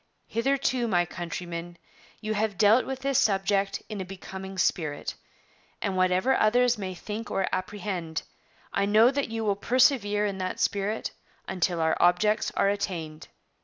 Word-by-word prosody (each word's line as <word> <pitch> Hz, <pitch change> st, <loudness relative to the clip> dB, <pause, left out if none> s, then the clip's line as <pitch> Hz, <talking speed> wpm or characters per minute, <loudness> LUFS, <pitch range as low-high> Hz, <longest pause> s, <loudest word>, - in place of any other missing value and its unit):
Hitherto, 255 Hz, +1 st, 0 dB
my 175 Hz, -5 st, +2 dB
countrymen, 175 Hz, 0 st, -6 dB, 0.4 s
you 215 Hz, 0 st, -2 dB
have 210 Hz, -2 st, -1 dB
dealt 215 Hz, +5 st, +5 dB
with 265 Hz, 0 st, -4 dB
this 275 Hz, -1 st, +2 dB
subject 195 Hz, -1 st, +1 dB
in 210 Hz, -3 st, -5 dB
a -, -, -2 dB
becoming 190 Hz, +1 st, -8 dB
spirit, 155 Hz, -5 st, 0 dB, 0.7 s
and, 195 Hz, -3 st, -2 dB
whatever 185 Hz, +7 st, +3 dB
others 245 Hz, +3 st, +3 dB
may 190 Hz, -4 st, -5 dB
think 215 Hz, +4 st, -6 dB
or 195 Hz, -, 0 dB
apprehend, 185 Hz, -4 st, -3 dB, 0.5 s
I 200 Hz, 0 st, +1 dB
know 220 Hz, +4 st, +6 dB
that 280 Hz, -2 st, -1 dB
you 225 Hz, 0 st, -3 dB
will 200 Hz, -1 st, +2 dB
persevere 210 Hz, -3 st, +3 dB
in 195 Hz, -2 st, -3 dB
that 185 Hz, 0 st, -3 dB
spirit 205 Hz, +2 st, -1 dB, 0.4 s
until 180 Hz, -2 st, 0 dB
our 160 Hz, 0 st, +2 dB
objects 210 Hz, +5 st, +3 dB
are -, -, +3 dB
attained. 170 Hz, -6 st, -3 dB
200 Hz, 150 wpm, -27 LUFS, 185-220 Hz, 0.7 s, know